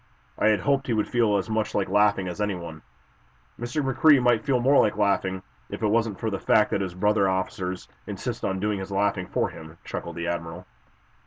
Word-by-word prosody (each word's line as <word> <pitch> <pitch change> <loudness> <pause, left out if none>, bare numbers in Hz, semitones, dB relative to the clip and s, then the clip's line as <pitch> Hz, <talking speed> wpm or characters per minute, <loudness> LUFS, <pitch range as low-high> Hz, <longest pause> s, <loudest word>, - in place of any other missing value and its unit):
"I - - +1
had 105 -3 +3
hoped 135 +6 +1
he 120 - 0
would 110 -2 0
feel 115 -4 +2
as 95 - -3
much 110 -1 -2
like 100 - +1
laughing 100 -1 +2
as 90 +4 -5
anyone." 85 -6 -4 0.8
"Mr. 120 +5 -2
McCrea 135 +2 +5
might 120 -3 +2
feel 135 -4 +1
more 135 +3 +4
like 105 - 0
laughing, 95 -2 0 0.3
if - - -6
it - - +3
weren't 110 -2 0
for 110 - -2
the 100 - -3
fact 105 -1 +3
that 100 - 0
his 90 -2 -4
brother 100 +1 +2
officers 95 -1 -3 0.2
insist - - -5
on 95 0 -1
doing 105 0 -1
his 95 - -6
laughing 100 -2 0
for - - -1
him," 80 +1 -12
chuckled 85 -1 -6
the 85 0 -4
admiral. 85 -1 -4
105 Hz, 210 wpm, -25 LUFS, 95-110 Hz, 0.8 s, McCrea